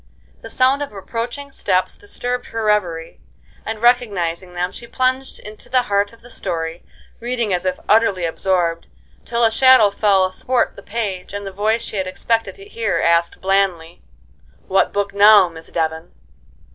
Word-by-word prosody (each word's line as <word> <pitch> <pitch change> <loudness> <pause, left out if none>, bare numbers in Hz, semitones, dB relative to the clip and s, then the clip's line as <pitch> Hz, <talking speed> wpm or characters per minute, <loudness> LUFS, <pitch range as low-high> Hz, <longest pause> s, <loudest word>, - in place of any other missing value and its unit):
The - - -9
sound 260 +2 +2
of 290 - -4
approaching 235 +7 -5
steps 185 -7 0
disturbed 250 -12 -4
her 225 0 -4
reverie, 180 -6 -1 0.4
and, 220 0 -5
recognizing 190 -8 +1
them, 180 +1 -1
she 235 - -11
plunged 260 +2 -1
into 210 0 -10
the 255 -1 +2
heart 205 -3 0
of 230 - -19
the 245 - -14
story, 165 -4 -4 0.4
reading 235 -4 -1
as 180 +1 -1
if 185 0 -1
utterly 210 -5 +3
absorbed, 170 0 -1 0.4
till 235 0 0
a 225 - +4
shadow 255 -3 +6
fell 200 -2 +3
athwart 240 +7 -1
the - - -11
page, 200 -3 -4
and 205 0 -5
the 195 - -5
voice 215 +4 0
she 215 - -5
had 190 -1 -1
expected 225 +4 -1
to 395 - -13
hear 230 - -2
asked 170 0 +1
blandly: 190 -4 0 0.7
"What 195 - +2
book 200 0 -2
now, 205 -1 +7
Miss 165 -1 -10
Devon?" 160 0 -3
205 Hz, 165 wpm, -19 LUFS, 185-235 Hz, 0.7 s, now